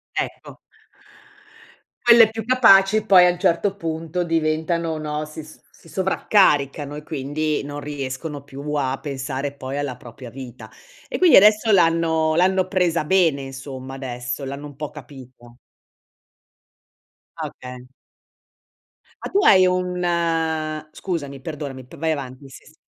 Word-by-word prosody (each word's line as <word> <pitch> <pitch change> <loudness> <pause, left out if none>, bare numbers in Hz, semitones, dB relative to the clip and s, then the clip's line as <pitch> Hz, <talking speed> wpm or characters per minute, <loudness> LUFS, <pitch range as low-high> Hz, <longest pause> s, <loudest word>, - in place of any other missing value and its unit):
Ecco. - - -5 1.5
Quelle 235 -2 +7
più 225 -1 -6
capaci 215 -4 +5
poi 185 -4 +7
a - - +4
un 175 - -7
certo 185 +3 +1
punto 165 0 -3
diventano 160 0 -1
no, 150 0 -4
si 155 0 -9
s 155 - -15 0.2
si - - -18
sovraccaricano 150 -6 +1
e 150 - -7
quindi 150 +1 -3
non 145 +1 -6
riescono 145 0 -6
più 140 +1 -8
a 135 -2 -1
pensare 140 0 -4
poi 140 0 -6
alla 140 -4 -3
propria 120 0 -11
vita. 120 -3 -10 0.4
E - - -4
quindi 360 -3 +6
adesso 215 +2 +5
l'hanno 165 -3 +2
l'hanno 185 +1 +2
presa 180 -4 +1
bene, 165 -5 +2
insomma, 135 0 -8
adesso, 125 0 -5
l'hanno 140 +2 -6
un 145 - -13
po' 150 0 -6
capita. 130 -4 -13 1.9
Ah, - - -3
okay. 125 0 -11 1.4
Ma - - -4
tu 400 0 +2
hai 185 -1 +7
un 180 0 -1 0.9
scusami, 145 -7 -5
perdonami, 140 -4 -7
p - - -14
vai 160 0 -1
avanti 135 -1 -6
sì, - - -14
sì. 155 - -18
150 Hz, 135 wpm, -22 LUFS, 135-180 Hz, 1.9 s, Quelle